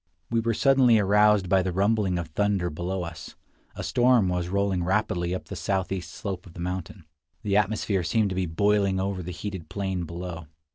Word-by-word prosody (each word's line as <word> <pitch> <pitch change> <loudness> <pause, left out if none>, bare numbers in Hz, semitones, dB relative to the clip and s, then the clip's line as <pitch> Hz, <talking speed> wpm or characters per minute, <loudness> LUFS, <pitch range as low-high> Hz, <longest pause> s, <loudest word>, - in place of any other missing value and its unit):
We 115 - +2
were 115 0 0
suddenly 130 -3 +5
aroused 105 -1 +4
by 95 +1 +3
the 95 0 -2
rumbling 100 0 +1
of 85 -2 -4
thunder 95 0 0
below 90 +4 -3
us. 85 -1 -8 0.4
A - - -5
storm 120 -5 +3
was 90 -1 -1
rolling 100 -2 0
rapidly 90 -2 0
up - - -6
the - - -7
southeast 95 -2 -2
slope 95 -4 -6
of 85 - -14
the - - -11
mountain. 90 0 -5 0.4
The 100 -1 +2
atmosphere 105 -2 +1
seemed 105 +4 +1
to 95 - -4
be 95 -1 -1
boiling 100 +2 +2
over 95 -1 -2
the 90 - -7
heated 95 0 -6
plain 95 -3 -3
below. 85 0 -7
95 Hz, 190 wpm, -26 LUFS, 90-105 Hz, 0.4 s, suddenly